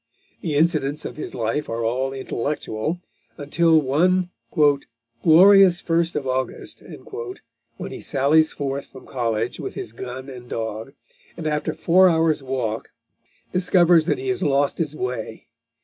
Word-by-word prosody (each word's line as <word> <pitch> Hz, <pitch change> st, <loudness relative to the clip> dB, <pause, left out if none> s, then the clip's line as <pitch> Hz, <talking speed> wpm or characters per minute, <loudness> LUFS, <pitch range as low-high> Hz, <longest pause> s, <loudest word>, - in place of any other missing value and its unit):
The 155 Hz, -4 st, -3 dB
incidents 150 Hz, -2 st, +1 dB
of -, -, -6 dB
his 155 Hz, -, -7 dB
life 115 Hz, +6 st, -2 dB
are 115 Hz, 0 st, -2 dB
all 130 Hz, +4 st, -1 dB
intellectual, 135 Hz, +2 st, -3 dB, 0.4 s
until 160 Hz, +3 st, +3 dB
one 175 Hz, +6 st, +1 dB, 0.9 s
"glorious 185 Hz, +2 st, +7 dB
first 165 Hz, 0 st, 0 dB
of 145 Hz, -2 st, -2 dB
August," 130 Hz, 0 st, -3 dB, 1.0 s
when -, -, -6 dB
he -, -, -7 dB
sallies 155 Hz, +3 st, +3 dB
forth 140 Hz, 0 st, -4 dB
from 130 Hz, -, -14 dB
college 115 Hz, -2 st, -2 dB
with -, -, -6 dB
his -, -, -5 dB
gun 125 Hz, +3 st, -7 dB
and 125 Hz, -2 st, -10 dB
dog, 110 Hz, +3 st, -5 dB, 0.4 s
and 165 Hz, -, -6 dB
after 150 Hz, -1 st, -1 dB
four 185 Hz, +2 st, +5 dB
hours' 160 Hz, -2 st, +2 dB
walk 125 Hz, -4 st, -3 dB, 0.6 s
discovers 175 Hz, -3 st, +4 dB
that -, -, +1 dB
he 390 Hz, 0 st, -4 dB
has 380 Hz, -, 0 dB
lost 140 Hz, -1 st, +1 dB
his 155 Hz, -2 st, -2 dB
way. 125 Hz, -5 st, -5 dB
145 Hz, 140 wpm, -22 LUFS, 130-165 Hz, 1.0 s, glorious